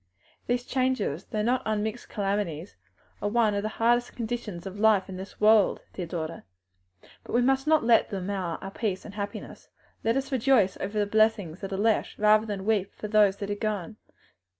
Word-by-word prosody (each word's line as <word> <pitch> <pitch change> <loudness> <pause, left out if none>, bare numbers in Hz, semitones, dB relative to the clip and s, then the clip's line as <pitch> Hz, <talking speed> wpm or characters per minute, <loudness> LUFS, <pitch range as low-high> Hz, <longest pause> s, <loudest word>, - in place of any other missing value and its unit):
These 245 0 0
changes, 255 - -1
though 210 -1 -2
not 245 +3 +1
unmixed 215 +2 -2
calamities, 195 -5 -2 0.5
are 205 - 0
one 220 -1 +2
of 200 - 0
the 215 - -2
hard 240 +3 +2
conditions 220 -7 -4
of 195 +1 -7
life 215 -3 +4
in 190 - -7
this 190 +1 -8
lower 215 +1 +7
world, - - -4
dear 180 -3 -5
daughter; 165 -1 -5 0.8
but - - -9
we 240 - +4
must 270 +2 +2
not 315 -3 +4
let 230 -1 +4
them 195 -4 -4
mar 185 -4 -2
our 195 - -6
peace 200 -3 -3
and 205 - -9
happiness; 205 0 -7 0.3
let 230 +3 +2
us 270 +1 -3
rejoice 245 -6 +3
over 200 +2 -4
the 205 - +2
blessings 210 -5 +1
that 195 -1 -5
are 190 - -2
left, 220 +2 +1
rather 215 +1 +4
than 200 -2 -4
weep 205 -3 0
for 210 - -6
those 210 -2 +4
that 200 0 -4
are - - +2
gone." 210 0 -3
210 Hz, 195 wpm, -27 LUFS, 195-230 Hz, 0.8 s, lower